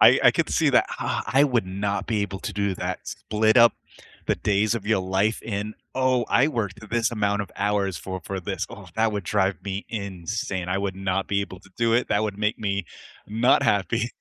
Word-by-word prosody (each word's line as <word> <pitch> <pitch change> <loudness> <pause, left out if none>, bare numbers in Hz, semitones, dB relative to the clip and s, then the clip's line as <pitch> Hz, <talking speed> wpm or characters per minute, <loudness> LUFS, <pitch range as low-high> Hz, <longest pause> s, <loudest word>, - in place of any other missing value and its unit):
I - - +7
I - - +8
could - - -1
see - - +3
that - - +4
ah, - - -1
I 135 +2 +4
would 120 -8 +1
not 100 +2 -2
be 110 -3 0
able 95 -1 -4
to - - -4
do 100 -2 0
that, 90 0 -4
split 110 +2 +1
up 120 -1 +8 0.5
the - - +2
days 105 +1 +1
of 110 -3 -4
your 110 -2 +2
life 95 +4 0
in 105 0 -3 0.2
"Oh, 130 -2 +2
I 140 - +4
worked 110 -5 -4
this 115 -1 +1
amount 105 -2 0
of 100 - -10
hours 100 -3 0
for 95 +1 -5
for 95 - -4
this." - - -3
Oh, - - -11
that 110 -1 +2
would 100 -3 -3
drive 95 0 0
me 100 0 -4
insane, 95 -2 -4
I 95 +2 0
would 100 -1 -2
not 95 0 -1
be 100 0 +1
able 95 -2 -6
to 95 - -20
do 115 0 +2
it, 120 - +2
that 105 - +2
would 105 -2 -2
make 105 0 0
me 100 -3 -1 0.4
not 115 +4 +3
happy. 115 +4 +1
100 Hz, 220 wpm, -25 LUFS, 95-110 Hz, 0.5 s, I